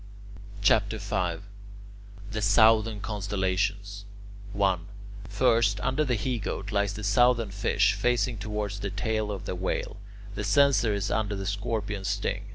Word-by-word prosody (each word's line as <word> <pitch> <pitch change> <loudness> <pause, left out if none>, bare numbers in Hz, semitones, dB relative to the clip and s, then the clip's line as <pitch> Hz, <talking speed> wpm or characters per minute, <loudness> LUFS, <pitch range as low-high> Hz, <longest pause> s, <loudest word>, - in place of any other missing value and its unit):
CHAPTER - - +3
V 90 -3 -1 1.0
THE 110 -1 -3
SOUTHERN 110 +1 +4
CONSTELLATIONS 100 0 -2 0.5
1. 95 -3 0 0.4
First, 110 -1 +2
under 140 +7 +1
the 130 -4 0
He 120 +2 -2
Goat 100 0 -4
lies 100 -1 0
the 110 - -7
Southern 115 +1 +3
Fish, 100 0 +2
facing 120 +1 0
towards 105 -1 -4
the 100 - -3
tail 110 +1 -2
of 100 -3 -6
the - - -3
Whale. 90 +1 -3 0.4
The - - -4
Censer 140 -7 +3
is 100 0 -2
under 105 0 -1
the 95 0 -5
Scorpion's 100 -1 -3
sting. - - -2
105 Hz, 140 wpm, -27 LUFS, 100-110 Hz, 1.0 s, SOUTHERN